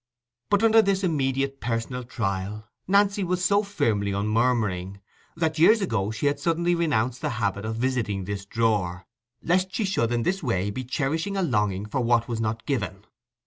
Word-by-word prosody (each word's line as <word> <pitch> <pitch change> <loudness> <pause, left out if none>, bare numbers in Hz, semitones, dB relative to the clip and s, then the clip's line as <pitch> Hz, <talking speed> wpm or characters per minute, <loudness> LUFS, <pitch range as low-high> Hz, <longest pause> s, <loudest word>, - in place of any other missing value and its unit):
But 205 +2 +3
under 225 0 +6
this 195 -2 0
immediate 135 -4 0
personal 120 +2 -2
trial 105 -3 -3 0.2
Nancy 200 +1 +3
was 180 0 -1
so 200 0 +4
firmly 115 - 0
unmurmuring, 105 -3 0 0.4
that 160 -1 -1
years 215 +8 +6
ago 110 - -1
she 110 +6 -3
had 145 0 +1
suddenly 170 +3 +1
renounced 130 -8 0
the 150 - -1
habit 100 -2 -1
of 110 +1 -3
visiting 115 -5 -1
this 100 +1 -4
drawer, 100 -5 0 0.4
lest 185 +2 +1
she 220 - 0
should 120 -12 0
in 120 -1 0
this 190 +7 0
way 105 - -1
be 130 +5 -4
cherishing 160 +9 -1
a 190 - +1
longing 105 - 0
for 125 +5 -2
what 120 -1 +2
was 115 -2 -3
not 110 0 -2
given. 100 -7 -3
120 Hz, 175 wpm, -25 LUFS, 105-170 Hz, 0.4 s, under